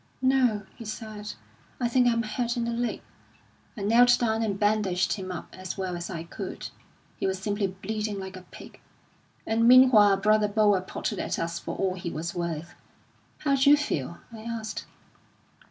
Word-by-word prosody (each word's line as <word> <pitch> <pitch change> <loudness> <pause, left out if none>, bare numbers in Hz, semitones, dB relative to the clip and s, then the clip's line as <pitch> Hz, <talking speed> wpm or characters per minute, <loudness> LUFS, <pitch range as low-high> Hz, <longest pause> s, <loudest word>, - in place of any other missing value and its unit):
'No,' 260 -5 +2
he - - -9
said, 215 -1 -6 0.5
'I 245 - +1
think 245 0 +3
I'm 230 -1 +2
hurt 235 +2 -2
in 235 - 0
the 235 - -1
leg.' 235 0 -2 0.7
I - - -5
knelt 245 +4 +6
down 225 -2 0
and 200 -3 -1
bandaged 205 -4 +1
him 185 -3 -5
up 180 - -7
as 185 0 -6
well 185 -2 -3
as 175 0 -5
I 165 -3 -5
could. 170 - -7 0.5
He - - -1
was 190 0 -1
simply 205 +1 -1
bleeding 205 +2 -4
like 190 -1 -7
a 185 - -9
pig; - - -12 0.7
and 230 +1 +2
meanwhile 240 -6 +7
brother 215 +1 +3
Boer 205 -2 +3
potted 185 - -4
at - - -2
us 170 0 -2
for - - -5
all 190 -1 0
he 175 -2 -5
was 165 +1 -4
worth. 170 -1 -4 0.7
'How 280 -2 +2
d'you 280 +2 +6
feel?' 170 - -3 0.2
I 220 - -9
asked. 225 -1 -5
210 Hz, 175 wpm, -27 LUFS, 185-230 Hz, 0.7 s, meanwhile